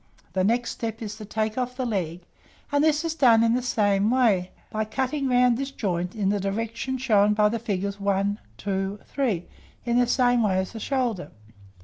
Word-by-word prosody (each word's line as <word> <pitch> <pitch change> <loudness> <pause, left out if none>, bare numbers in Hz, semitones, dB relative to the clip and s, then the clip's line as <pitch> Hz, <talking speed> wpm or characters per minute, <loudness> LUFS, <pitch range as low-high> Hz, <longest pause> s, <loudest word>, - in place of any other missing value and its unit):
The 185 - +1
next 235 +4 +1
step 225 -1 -4
is 210 -1 -5
to 215 - -8
take 215 +2 -2
off 250 0 -3
the 260 - -1
leg; 180 -7 -2 0.5
and 285 0 +3
this 310 +1 +2
is 330 - -1
done 240 -7 +5
in 230 0 +3
the 250 - +1
same 205 -4 +2
way, 220 -8 +2 0.2
by 215 0 -1
cutting 265 +6 -2
round 250 -1 +4
this 275 0 -2
joint 180 -8 -3
in 200 -3 0
the 205 0 +1
direction 230 +6 -3
shown 210 -5 +3
by 210 0 +4
the 230 +1 -2
figures 200 -2 -3
1, 200 +1 0 0.2
2, 195 - -2
3, 225 -11 -1 0.4
in 240 0 +2
the 245 - +3
same 245 -1 +3
way 195 -4 +2
as 190 0 -1
the 225 - -7
shoulder. 235 - -1
220 Hz, 200 wpm, -25 LUFS, 200-250 Hz, 0.5 s, done